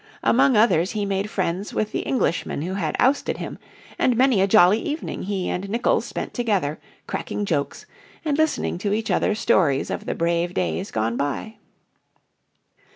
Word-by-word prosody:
Among 260 -1 +4
others 195 -5 +3
he 210 -2 -1
made 200 +1 -1
friends 190 0 -2
with 215 - -1
the - - -2
Englishman 180 - -1
who 185 +3 -3
had 170 -6 -2
ousted 270 +3 +2
him, - - -6 0.4
and 245 -2 +2
many 255 -6 +4
a 195 - +3
jolly 205 0 +6
evening 305 +2 -4
he 195 -1 -2
and 195 +2 -3
Nicolls 235 +3 +1
spent - - -5
together 200 - 0 0.3
cracking 205 - -3
jokes 150 -7 -2 0.4
and 295 -2 +1
listening 315 - 0
to 205 +1 -1
each 220 +1 -1
other's 215 - +1
stories 165 - +2
of - - -5
the - - -1
brave 170 +1 0
days 85 -3 -1
gone 110 +2 -1
by. 145 +10 -3
200 Hz, 165 wpm, -23 LUFS, 170-225 Hz, 0.4 s, jolly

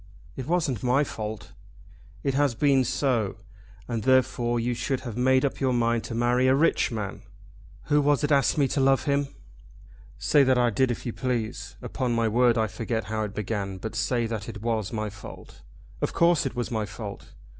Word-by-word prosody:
"It 130 - -6
wasn't 155 - 0
my 130 +3 +3
fault." 110 -5 -6 0.7
"It 135 - 0
has 140 -3 +2
been 135 +1 +3
so, 120 -6 0 0.5
and 115 -2 -2
therefore 120 -1 +2
you 120 +1 0
should 120 +3 -2
have 120 -4 -6
made 130 +2 +3
up 140 - -2
your 130 -2 +1
mind 115 -1 +1
to 115 - -5
marry 120 +2 +2
a 130 - +5
rich 150 -2 +2
man." 100 -3 -4 0.6
"Who 150 0 +2
was 145 0 +2
it 145 - 0
asked 140 -1 +3
me 140 -2 +3
to - - -1
love 135 0 +3
him?" 140 0 +1 0.9
"Say 145 - +3
that 130 -1 +3
I 120 -1 +3
did 130 +4 +2
if 120 - -4
you 120 - -3
please. 115 -4 -3
Upon 125 -3 -2
my 115 -1 +2
word 120 +2 +3
I 110 - +2
forget 110 +2 -3
how 110 0 -3
it 105 - -8
began, 100 -2 -3
but 110 +4 -6
say 120 +1 0
that 110 -1 -4
it 105 -2 -8
was 110 -4 -1
my 110 -2 -3
fault. 100 0 -12 0.4
Of - - -1
course 170 -4 +3
it 130 - -7
was 120 0 -3
my 110 -2 -1
fault. 100 +1 -8
120 Hz, 200 wpm, -26 LUFS, 110-135 Hz, 0.9 s, a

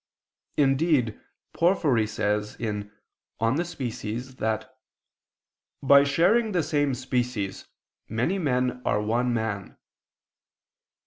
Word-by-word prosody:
Indeed 135 -4 +2 0.3
Porphyry 150 - +2
says 105 0 -1
(Praedic., 105 -3 -3 0.5
De 115 +9 +1
Specie) 120 -9 -4 0.2
that 110 0 -2 1.1
"by 140 +1 +7
sharing 200 +10 +3
the 175 -3 +2
same 145 -3 +1
species, 125 -5 -2 0.4
many 120 - 0
men 125 -5 0
are 105 - +1
one 120 +4 0
man." 110 -4 -3
125 Hz, 90 wpm, -26 LUFS, 110-145 Hz, 1.1 s, by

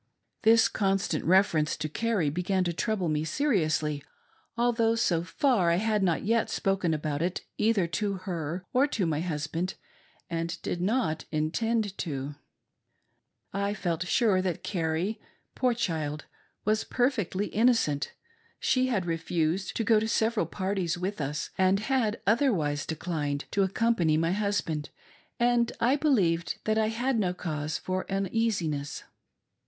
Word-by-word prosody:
This 225 0 +6
constant 195 -5 0
reference 170 -4 +3
to 155 - -2
Carrie 195 -3 0
began 185 +3 0
to 175 -1 -1
trouble 200 0 -1
me 155 -1 0
se 210 - -2
riously, 155 - +1 0.6
although, 230 -1 +2
so 175 -7 +2
far, 205 - +2
I 170 - +4
had 215 +2 +1
not 175 -4 +1
yet 225 +2 +1
spoken 195 -4 0
about 150 -1 -2
it 175 +2 -1 0.2
either 215 -4 +3
to 200 +5 -1
her 180 -2 -4
or 265 +3 +4
to 220 -9 -1
my 155 -2 0
husband, 165 +2 -2 0.5
and 165 0 -3
did 175 - -2
not 190 -6 0
intend 205 +7 0
to. 140 -4 -3 1.2
I 200 +1 -1
felt 180 -3 -2
sure 205 -3 +3
that 185 -3 -2
Carrie, 175 +4 -1 0.3
poor 250 -2 +1
child, 155 -8 -2 0.4
was 215 +1 +2
perfectly 220 -6 0
innocent; 220 - +2 0.5
she 255 0 +2
had 205 -8 0
refused 165 +2 -1
to 230 - 0
go 220 0 +4
to 220 - -1
several 220 -5 +1
parties 180 +2 -1
with 185 0 -3
us, 145 +2 -3
and 190 +1 +4
had 225 -2 0
otherwise 195 - +2
declined 150 -3 -2
to 200 - +1
accompany 190 -5 +2
my 165 +1 +1
husband, 190 -7 -1 0.5
and 240 -1 +3
I 250 +4 +3
believed 195 - +1
that 220 0 +1
I 215 - +2
had 240 +2 0
no 180 -3 0
cause 155 -3 -3
for 185 0 -3
uneasiness. 195 -7 -1
185 Hz, 145 wpm, -28 LUFS, 160-220 Hz, 1.2 s, This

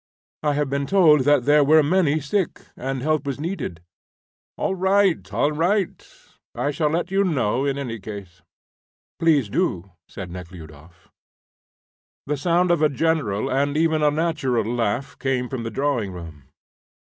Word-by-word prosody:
"I 150 -1 +1
have 145 -1 0
been 140 +1 -2
told 155 -8 +5
that 145 -4 +3
there 145 0 +5
were 155 +2 +5
many 155 -1 +2
sick, 170 +5 -2
and 135 0 -4
help 155 -1 +1
was 140 -1 -4
needed." 150 - -5 0.7
"All - - -1
right, 190 -1 +2
all 145 - +1
right. 175 +5 0 0.5
I 145 - -1
shall 150 +1 0
let 170 +4 -2
you 195 +1 +3
know 135 - 0
in 140 -1 -1
any 120 -5 -4
case." 95 -4 -9 0.8
"Please 155 -8 +3
do," 95 -2 -1 0.2
said 95 -3 -8
Nekhludoff. 85 -3 -12 1.2
The 150 - -1
sound 175 +4 +2
of 170 -3 +2
a 155 - +4
general 140 -9 0
and 140 +2 0
even 160 -1 +2
a 150 - +4
natural 145 -7 0
laugh 120 +3 -2
came 130 -2 -1
from 130 -1 -5
the 115 - -4
drawing 125 -4 -1
room. 80 -6 -10
140 Hz, 155 wpm, -23 LUFS, 115-160 Hz, 1.2 s, told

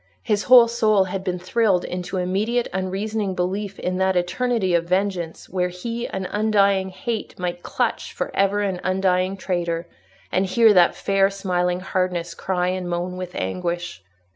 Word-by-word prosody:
His 205 -1 0
whole 245 -2 +8
soul 215 -4 +3
had 190 0 -4
been 180 -2 -2
thrilled 185 0 +1
into 180 +1 -4
immediate 205 +7 0
unreasoning 195 +1 -2
belief 195 +3 -2
in 185 0 -2
that 190 0 +2
eternity 190 +2 0
of 170 0 +2
vengeance 185 -2 -1
where 180 -1 0
he, 230 +7 -4
an 190 -1 -4
undying 200 -3 +2
hate, 230 +3 -5
might 175 -1 -3
clutch - - -2
for - - -4
ever 195 +1 +2
an 190 -3 -2
undying 185 0 +1
traitor, 175 -2 -2 0.4
and 190 +1 +1
hear 220 +3 +5
that 175 -3 +5
fair 195 0 +2
smiling 180 -2 -1
hardness 180 -2 -1
cry 180 +1 -1
and 185 -1 -3
moan 175 +1 -2
with 180 -1 -6
anguish. 175 - -3
185 Hz, 160 wpm, -22 LUFS, 180-200 Hz, 0.4 s, whole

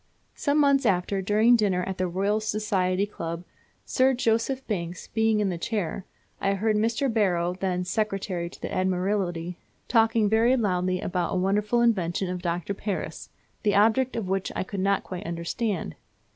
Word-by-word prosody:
Some 285 0 0
months 280 -3 +4
after, 190 0 +1
during 215 +5 +4
dinner 195 -5 +1
at 190 0 -5
the 185 - +1
Royal 195 +4 0
Society 200 -3 0
Club, 170 -4 -5 0.4
Sir 260 0 +3
Joseph 240 +3 0
Banks 175 -4 -4
being 220 -1 +2
in 205 -2 +1
the 175 -2 -3
chair, 195 -2 -2 0.3
I 195 0 +1
heard 215 +2 +1
Mr. 230 +6 +1
Barrow, 180 -5 +1
then 180 -1 -2
secretary 195 -3 -2
to - - -14
the - - -5
Admiralty, 180 -2 -1 0.3
talking 225 -2 +3
very 230 +5 +3
loudly 185 -4 0
about 180 0 -1
a - - +1
wonderful 210 +5 +2
invention 185 -5 +1
of 180 -1 -4
Dr. 175 +2 -2
Paris, 200 -1 -4 0.3
the 205 -2 +2
object 225 +5 +3
of 225 -5 -2
which 190 0 -1
I - - -1
could 195 +1 -6
not 195 +1 +1
quite 185 +2 -6
understand. 170 - -2
195 Hz, 165 wpm, -26 LUFS, 180-220 Hz, 0.4 s, months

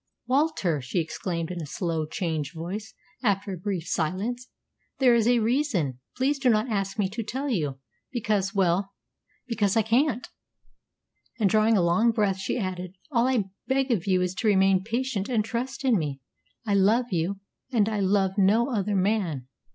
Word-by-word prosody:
"Walter," 255 - +1
she 130 +8 -4
exclaimed 170 0 -2
in 175 -1 -4
a 155 - -6
slow, 160 0 -2
changed 160 -3 -3
voice, 190 +7 -6 0.3
after 200 -4 0
a - - -5
brief 185 -2 -2
silence, 210 +10 -2 0.5
"there 255 -3 +5
is 230 -1 +3
a 245 0 +5
reason. 220 - 0 0.2
Please 275 +2 +1
do 265 -2 +3
not 215 +1 +3
ask 195 -1 -1
me 205 -3 +2
to 220 +4 -4
tell 260 +6 -3
you 150 - -1 0.3
because 210 -5 0
well, 195 0 +1 0.5
because 220 -4 +1
I 225 - +4
can't." 245 +3 +1 1.1
And, 200 -4 +3
drawing 215 0 +4
a 180 - +3
long 175 +8 +3
breath, 210 -4 +1
she 190 - -2
added, 185 -3 -4 0.2
"All 240 -2 +3
I 220 -8 0 0.2
beg 270 0 +1
of 195 -7 0
you 185 -1 +3
is 180 0 -1
to 225 - 0
remain 190 -2 +4
patient 230 -1 -2
and 220 -4 +1
trust 250 +5 -4
in 240 -7 +4
me. 145 -3 -3 0.5
I 205 - 0
love 215 +5 +3
you; 180 +3 -1 0.3
and 220 -5 +3
I 215 -2 -1
love 195 0 +1
no 225 +7 +3
other 205 -1 0
man. 185 - 0
205 Hz, 175 wpm, -26 LUFS, 185-235 Hz, 1.1 s, there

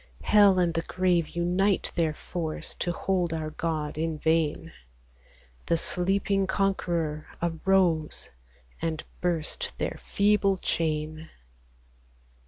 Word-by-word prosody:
Hell 205 -3 +6
and 175 -2 +2
the 165 - 0
grave 180 -2 +1
unite 180 +3 +1
their 160 -3 0
force 160 -1 -5
To 175 - -2
hold 175 -1 0
our 155 -1 -3
God, 155 -2 -3
in 160 -1 -1
vain 160 -1 +2
• 165 - -12 1.0
The 170 - +3
sleeping 195 +3 +1
Conqueror 170 -6 -1
arose, 170 -1 +1 0.5
And 160 -1 -2 0.2
burst 180 - -1
their - - -3
feeble 200 -1 +2
chain. 155 -2 -2
170 Hz, 110 wpm, -27 LUFS, 160-190 Hz, 1.0 s, Hell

